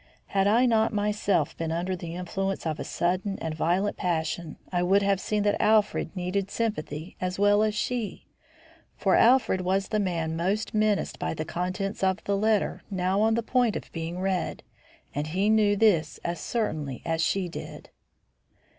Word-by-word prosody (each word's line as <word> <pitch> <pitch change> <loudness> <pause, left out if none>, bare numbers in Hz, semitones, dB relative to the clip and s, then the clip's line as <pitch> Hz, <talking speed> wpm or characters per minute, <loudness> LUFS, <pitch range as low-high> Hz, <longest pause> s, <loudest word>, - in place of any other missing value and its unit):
Had 195 0 +3
I 230 +5 +4
not 225 -2 +3
myself 205 -6 0
been 165 -1 -3
under 175 +3 -1
the 170 -1 -7
influence 190 +2 -3
of 155 -2 -2
a - - -2
sudden 185 +3 -1
and 160 -1 -4
violent 180 +6 0
passion, 165 -1 -2
I 175 -1 +1
would 195 +3 +3
have 195 -1 +2
seen 210 +1 0
that 205 0 +1
Alfred 215 -1 +2
needed 185 +2 -2
sympathy 180 -8 -3
as 185 0 -2
well 205 +1 +4
as 215 -1 +1
she; 235 -1 -3 0.7
for - - +2
Alfred 240 -6 +4
was 190 +2 0
the 215 - +1
man 165 -5 -1
most 195 +6 -1
menaced 215 -2 +1
by - - -2
the 155 - -3
contents 185 +4 -3
of 190 +1 +1
the 200 - 0
letter 215 +1 +1
now 190 0 0
on 220 +1 +3
the 230 - 0
point 245 -2 +2
of - - -6
being 165 +2 -4
read; 185 -2 -1 0.5
and 145 +2 -2
he 190 +6 +1
knew 210 -2 +4
this 185 -8 +2
as 170 -1 -3
certainly 155 - -3
as 165 -1 0
she 190 +1 +1
did. 170 - -9
195 Hz, 175 wpm, -27 LUFS, 170-210 Hz, 0.7 s, I